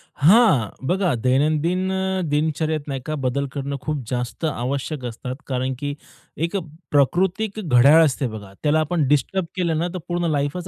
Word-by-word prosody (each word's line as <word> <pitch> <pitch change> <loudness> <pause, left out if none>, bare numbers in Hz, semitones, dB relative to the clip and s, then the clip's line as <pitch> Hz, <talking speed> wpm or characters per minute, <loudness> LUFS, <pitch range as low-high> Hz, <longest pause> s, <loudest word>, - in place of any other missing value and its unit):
हां, 145 - +5 0.2
बघा 180 -4 +1
दैनंदिन 155 +8 +1
अ, 190 0 -1
दिनचर्यात 155 0 0
नाही 135 -2 -3
का 155 - -2
बदल 140 +2 0
करणं 140 0 -3
खूप 150 -4 -3
जास्त 125 +5 -3
आवश्यक 135 0 -3
असतात 125 +2 -5
कारण 130 0 -1
की 145 0 -3 0.5
एक 170 - -5
अ, - - 0 0.3
प्राकृतिक 190 +9 +1
घड्याळ 140 +5 +6
असते 135 -2 0
बघा. 105 -3 -9
त्याला 155 +1 +3
आपण 155 -2 0
डिस्टर्ब 165 +6 +1
केलं 170 -4 0
ना, 170 +2 0
तर - - -3
पूर्ण 175 -1 -1
लाईफच 145 +5 -2
150 Hz, 165 wpm, -22 LUFS, 135-175 Hz, 0.5 s, घड्याळ